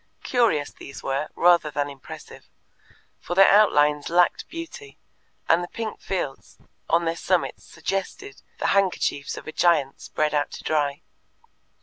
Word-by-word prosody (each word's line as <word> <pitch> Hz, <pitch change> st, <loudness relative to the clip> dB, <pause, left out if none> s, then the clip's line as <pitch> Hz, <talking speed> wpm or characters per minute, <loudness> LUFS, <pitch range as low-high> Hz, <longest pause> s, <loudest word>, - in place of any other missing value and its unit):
Curious 220 Hz, -, +1 dB
these 140 Hz, -, -11 dB
were, 140 Hz, +3 st, -2 dB
rather 170 Hz, -3 st, +4 dB
than 145 Hz, 0 st, -2 dB
impressive, 140 Hz, -2 st, -11 dB, 0.7 s
for 175 Hz, -, -5 dB
their 195 Hz, +1 st, +7 dB
outlines 150 Hz, -8 st, +4 dB
lacked 175 Hz, +1 st, +2 dB
beauty, 385 Hz, +6 st, -9 dB, 0.5 s
and 170 Hz, +2 st, +4 dB
the -, -, -5 dB
pink 220 Hz, +1 st, -5 dB
fields 160 Hz, -8 st, -4 dB, 0.3 s
on 170 Hz, +1 st, +3 dB
their 165 Hz, 0 st, 0 dB
summits 180 Hz, +1 st, -1 dB
suggested 195 Hz, -, -5 dB, 0.2 s
the -, -, 0 dB
handkerchiefs 185 Hz, -7 st, 0 dB
of -, -, -9 dB
a -, -, -4 dB
giant 155 Hz, -6 st, +2 dB
spread 155 Hz, 0 st, -1 dB
out 145 Hz, -1 st, +1 dB
to -, -, -8 dB
dry. 145 Hz, -2 st, 0 dB
170 Hz, 140 wpm, -24 LUFS, 145-195 Hz, 0.7 s, their